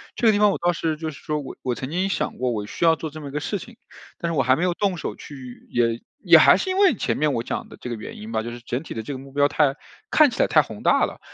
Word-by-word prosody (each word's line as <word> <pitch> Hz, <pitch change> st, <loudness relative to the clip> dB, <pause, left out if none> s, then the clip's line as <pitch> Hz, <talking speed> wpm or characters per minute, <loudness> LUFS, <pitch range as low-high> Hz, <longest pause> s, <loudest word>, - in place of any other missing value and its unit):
这 235 Hz, -, +2 dB
个 220 Hz, -, +7 dB
地 205 Hz, -, +1 dB
方 210 Hz, -1 st, +5 dB
我 -, -, -3 dB
倒 175 Hz, 0 st, +2 dB
是 160 Hz, -1 st, -1 dB
就 160 Hz, +1 st, -4 dB
是 150 Hz, -, -10 dB
说 150 Hz, 0 st, -2 dB
我 140 Hz, -, -8 dB
我 125 Hz, -, 0 dB
曾 130 Hz, +2 st, -5 dB
经 180 Hz, +5 st, 0 dB
想 190 Hz, -, -2 dB
过 125 Hz, 0 st, 0 dB
我 105 Hz, -3 st, -3 dB
需 170 Hz, -, -2 dB
要 165 Hz, -1 st, +6 dB
做 160 Hz, 0 st, -5 dB
这 155 Hz, +1 st, -10 dB
么 145 Hz, -2 st, -7 dB
一 -, -, -10 dB
个 150 Hz, -, -2 dB
事 200 Hz, +7 st, -2 dB
情， 235 Hz, +6 st, -11 dB, 0.4 s
但 170 Hz, 0 st, -2 dB
是 160 Hz, -, -2 dB
我 135 Hz, -, +3 dB
还 130 Hz, +1 st, +4 dB
没 165 Hz, -, -2 dB
有 180 Hz, -1 st, +1 dB
动 195 Hz, -1 st, 0 dB
手 -, -, -4 dB
去 130 Hz, -4 st, -11 dB
也 115 Hz, -1 st, +1 dB, 0.2 s
也 -, -, +7 dB
还 -, -, +7 dB
是 380 Hz, -, -3 dB
因 375 Hz, -, -1 dB
为 390 Hz, -7 st, +5 dB
前 -, -, -2 dB
面 150 Hz, -2 st, +1 dB
我 115 Hz, -, -1 dB
讲 -, -, -4 dB
的 -, -, -13 dB
这 -, -, -6 dB
个 120 Hz, -, -3 dB
原 110 Hz, -, -9 dB
因 110 Hz, +2 st, -8 dB
吧， 110 Hz, -1 st, -1 dB
就 120 Hz, -, -5 dB
是 120 Hz, -, -8 dB
整 125 Hz, +4 st, -4 dB
体 -, -, -7 dB
的 110 Hz, -, -4 dB
这 110 Hz, -, -7 dB
个 135 Hz, -, -4 dB
目 135 Hz, +1 st, -12 dB
标 145 Hz, +1 st, +3 dB
太 145 Hz, -1 st, +2 dB, 0.4 s
看 305 Hz, -2 st, +6 dB
起 240 Hz, -, -8 dB
来 -, -, +5 dB
太 -, -, +5 dB
宏 -, -, -9 dB
大 -, -, +4 dB
了， -, -, -8 dB
150 Hz, 360 characters per minute, -23 LUFS, 125-175 Hz, 0.4 s, 个